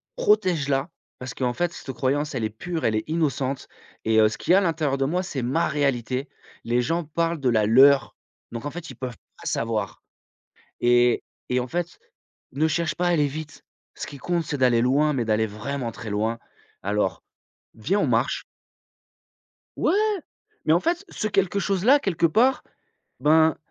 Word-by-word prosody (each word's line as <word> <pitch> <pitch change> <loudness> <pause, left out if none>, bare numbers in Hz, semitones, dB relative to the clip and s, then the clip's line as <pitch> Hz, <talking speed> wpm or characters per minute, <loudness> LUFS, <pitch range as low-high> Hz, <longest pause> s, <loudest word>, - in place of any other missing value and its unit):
protège 185 - +2
la. 135 +4 0 0.3
Parce 125 -1 -6
qu'en 125 -2 -1
fait 175 +5 -1
cette 135 - -7
croyance, 145 +4 -1
elle 120 -4 -1
est - - -1
pure, 160 +10 -4
elle 110 - +2
est 110 - 0
innocente 140 -4 -1 0.4
et 110 0 +4
heu, 110 - +5
ce 110 - -6
qu'il 180 - +1
y - - +8
a 195 - +5
l'intérieur 160 -6 0
de 135 - 0
moi, 180 +6 0
c'est 140 -7 -4
ma 135 +8 +1
réalité. 135 -2 -1 0.3
Les 120 +1 +1
gens 165 +7 -1
parlent 165 +1 -1
de 130 - +2
la 110 -3 +3
leur, 135 +4 +5 0.4
donc 115 - -5
en 145 - -3
fait 175 0 -8
ils 130 - -9
peuvent 125 -3 -6 0.2
pas - - -15
savoir - - -2 0.8
et 120 0 +3 0.2
et 125 - +1
en 125 - -1
fait, 175 - -4 0.5
ne 155 +4 +1
cherche 170 +1 0
pas 180 - -1
à 175 - +3
aller 150 -4 +3
vite. 155 +2 -7 0.3
Ce - - -5
qui 140 - -9
compte 170 +3 -1
c'est 145 - -3
d'aller 125 -3 +4
loin, 145 +4 +3
mais 125 -3 0
d'aller 110 0 +1
vraiment 120 +4 -4
très 110 -1 -8
loin. 110 +3 -1 0.5
Alors, 105 +1 -1 0.5
viens 180 - 0
on - - +2
marche». - - 0 1.3
Ouais! - - +2 0.7
Mais 155 - +3
en 170 - +4
fait, 345 - -1
ce 215 - -3
quelque 195 0 +1
chose 195 -1 -1
là 275 +5 +7
quelque 170 - +1
part, 240 +10 +3 0.6
ben 160 +1 +4
145 Hz, 185 wpm, -24 LUFS, 125-170 Hz, 1.3 s, y